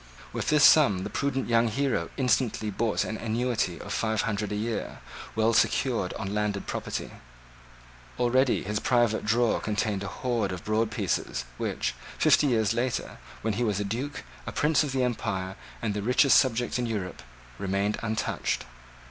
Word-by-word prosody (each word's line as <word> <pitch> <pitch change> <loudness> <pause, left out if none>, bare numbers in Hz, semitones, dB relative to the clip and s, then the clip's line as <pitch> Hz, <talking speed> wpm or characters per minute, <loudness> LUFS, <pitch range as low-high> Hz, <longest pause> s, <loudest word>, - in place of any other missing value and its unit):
With - - -2
this 150 -1 +4
sum 105 -13 +6
the - - -5
prudent 135 -2 -1
young 115 0 +3
hero 115 -7 0
instantly 125 -4 +1
bought 110 +2 0
an 110 - -4
annuity 115 -5 -1
of - - -6
five 110 -2 0
hundred 105 -2 -2
a - - -1
year, 110 +2 -3 0.4
well 110 +1 +3
secured 120 -6 +2
on 100 -1 -4
landed 105 -1 -1
property. - - -4 1.1
Already 125 +2 +3
his 105 +2 -2
private 120 -3 +2
drawer 115 +2 +2
contained 105 -2 -1
a 100 - -4
hoard 115 -1 -1
of 90 -2 -6
broad 110 +1 +1
pieces 105 - -2
which, - - -1 0.2
fifty 150 - +4
years 110 -4 +2
later, 120 +1 -2 0.2
when 110 -1 0
he 120 - -1
was 105 -4 0
a - - 0
Duke, 120 +9 -4 0.2
a - - -2
Prince 150 +1 +2
of 145 - -3
the 130 -1 +1
Empire, 95 -6 -2 0.3
and 105 -3 0
the 105 - -2
richest 125 +5 +5
subject 125 0 0
in 120 - -1
Europe, 100 - -4 0.4
remained 100 +2 0
untouched. 110 -1 -1
110 Hz, 165 wpm, -27 LUFS, 105-125 Hz, 1.1 s, sum